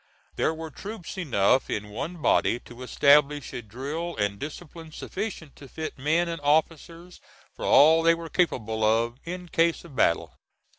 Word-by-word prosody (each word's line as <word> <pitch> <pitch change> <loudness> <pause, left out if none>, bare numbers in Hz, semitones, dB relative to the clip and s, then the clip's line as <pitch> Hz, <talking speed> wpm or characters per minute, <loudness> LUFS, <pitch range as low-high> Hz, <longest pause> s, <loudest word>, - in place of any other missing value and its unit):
There - - +1
were 160 0 -7
troops 205 +2 -8
enough 130 - +1
in 105 0 -3
one 155 +9 -6
body 120 - +2
to 120 +1 -13
establish 145 +2 +3
a - - -4
drill 140 +10 -5
and 100 -1 -1
discipline 160 +2 -8
sufficient 185 -4 -6
to 140 - -12
fit 155 +1 -7
men 160 +5 +1
and 165 -2 -5
officers 165 +4 -1 0.3
for - - -6
all 160 +3 +6
they 165 0 +4
were 165 0 -7
capable 110 - -1
of 115 +3 +1
in 180 +1 -6
case 165 0 +1
of 150 -6 -13
battle. 85 - +1
155 Hz, 160 wpm, -26 LUFS, 125-170 Hz, 0.3 s, all